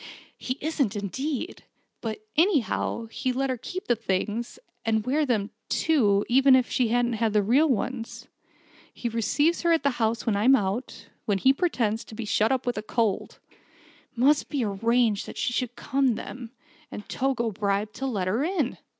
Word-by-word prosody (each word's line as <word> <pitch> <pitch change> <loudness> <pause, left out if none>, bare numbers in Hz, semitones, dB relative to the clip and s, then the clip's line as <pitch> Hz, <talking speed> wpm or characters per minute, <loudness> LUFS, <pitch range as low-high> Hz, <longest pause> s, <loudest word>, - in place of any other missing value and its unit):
"He 255 +1 -3
isn't, 280 -8 0
indeed! 265 - -4 0.4
But, 215 -1 -5
anyhow, 300 - +1
he 260 +2 -1
let 265 +1 -1
her 255 - -2
keep 365 +10 -6
the 240 - +2
things 215 +2 -2 0.3
and 220 -1 0
wear 290 +4 +1
them, 215 -3 0 0.2
too; 210 -11 +2
even 265 +2 +6
if 255 -2 +1
she 245 -3 +2
never 240 0 +1
had 220 -1 0
the 210 -1 +3
real 270 +10 +4
ones. 245 -1 -3 0.6
He 240 - -4
receives 290 +9 +1
her 340 - +2
at 325 -4 +3
the 280 - +3
house 225 0 0
when 225 -4 +1
I'm 240 +7 +5
out 210 +2 -3 0.2
when 205 -2 +1
he 265 +8 +4
pretends 235 - 0
to 220 - -11
be 230 0 -5
shut 210 +2 +2
up 260 -1 0
with 245 -3 -1
a - - -4
cold. 215 -2 -1 0.7
It - - -35
must 280 +5 +4
have - - -41
been 280 -4 -1 0.2
arranged 230 -3 +2
that - - -9
she 240 - -1
should 245 -1 -2
come 265 -1 +1
then, 240 +1 -7 0.4
and 210 - -8
Togo 255 -4 -1
bribed 205 +1 -1
to 270 - -2
let 200 -8 -1
her 220 +9 +1
in. 320 -7 -1
240 Hz, 185 wpm, -26 LUFS, 215-270 Hz, 0.7 s, even